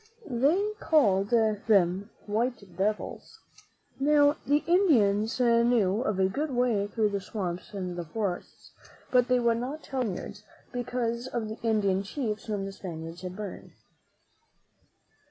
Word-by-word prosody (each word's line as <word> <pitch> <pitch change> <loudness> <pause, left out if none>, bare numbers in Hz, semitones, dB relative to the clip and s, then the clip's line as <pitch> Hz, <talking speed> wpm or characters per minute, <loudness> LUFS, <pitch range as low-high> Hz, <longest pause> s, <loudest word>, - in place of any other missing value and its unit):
They 315 - +2
called 200 - +3
them 205 -4 +2 0.2
white 215 -3 -2
devils. 210 +4 -3 0.6
Now, 290 +1 +4
the 290 +2 +3
Indians 230 - +3
knew 235 -4 +3
of 215 -6 -1
a 190 - +4
good 290 +11 -2
way 240 -6 +1
through 215 0 +1
the 200 -1 -2
swamps 185 -3 -5
and 180 -2 -4
the 175 -1 -4
forests, 190 +1 -5 0.4
but 250 -1 +4
they 250 0 +3
would 235 -1 +2
not 275 +6 -5
tell 265 -2 -3
the 245 - 0
Spaniards, 205 +3 -8 0.3
because 240 -1 -2
of 230 -4 -3
the 220 - -7
Indian 205 -4 +1
chiefs 215 +1 -4
whom 205 -2 -2
the 195 - -5
Spaniards 165 -3 -7
had 185 0 -6
burned. 205 -2 -7
220 Hz, 140 wpm, -28 LUFS, 195-250 Hz, 0.6 s, Now